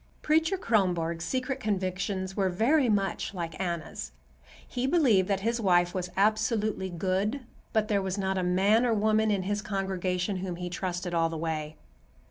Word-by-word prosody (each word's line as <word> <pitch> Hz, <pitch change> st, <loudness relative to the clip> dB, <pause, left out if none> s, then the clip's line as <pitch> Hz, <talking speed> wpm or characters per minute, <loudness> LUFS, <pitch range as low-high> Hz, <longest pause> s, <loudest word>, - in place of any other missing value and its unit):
Preacher 320 Hz, +5 st, +2 dB
Kronborg's 175 Hz, -, 0 dB
secret 260 Hz, +3 st, -2 dB
convictions 190 Hz, -3 st, -2 dB
were 195 Hz, -2 st, +1 dB
very 245 Hz, -, +3 dB
much 200 Hz, 0 st, 0 dB
like 165 Hz, -2 st, -5 dB
Anna's. 170 Hz, -4 st, -4 dB, 0.5 s
He 255 Hz, +1 st, -2 dB
believed 255 Hz, -, +4 dB
that 195 Hz, -1 st, 0 dB
his 230 Hz, +3 st, 0 dB
wife 175 Hz, -3 st, +3 dB
was 180 Hz, -1 st, -3 dB
absolutely 215 Hz, -1 st, +1 dB
good, 190 Hz, +8 st, -1 dB, 0.3 s
but 215 Hz, -2 st, +1 dB
there 205 Hz, -2 st, +1 dB
was 190 Hz, 0 st, -3 dB
not 190 Hz, -1 st, 0 dB
a 185 Hz, -, 0 dB
man 195 Hz, +6 st, +3 dB
or 235 Hz, -2 st, +2 dB
woman 215 Hz, +1 st, +2 dB
in 200 Hz, -3 st, +1 dB
his 205 Hz, +2 st, -1 dB
congregation 190 Hz, -1 st, -2 dB
whom 185 Hz, -1 st, -4 dB
he 175 Hz, 0 st, -5 dB
trusted 180 Hz, -1 st, -3 dB
all 165 Hz, -1 st, +2 dB
the 165 Hz, -, -5 dB
way. 155 Hz, -1 st, -3 dB
195 Hz, 165 wpm, -28 LUFS, 180-215 Hz, 0.5 s, believed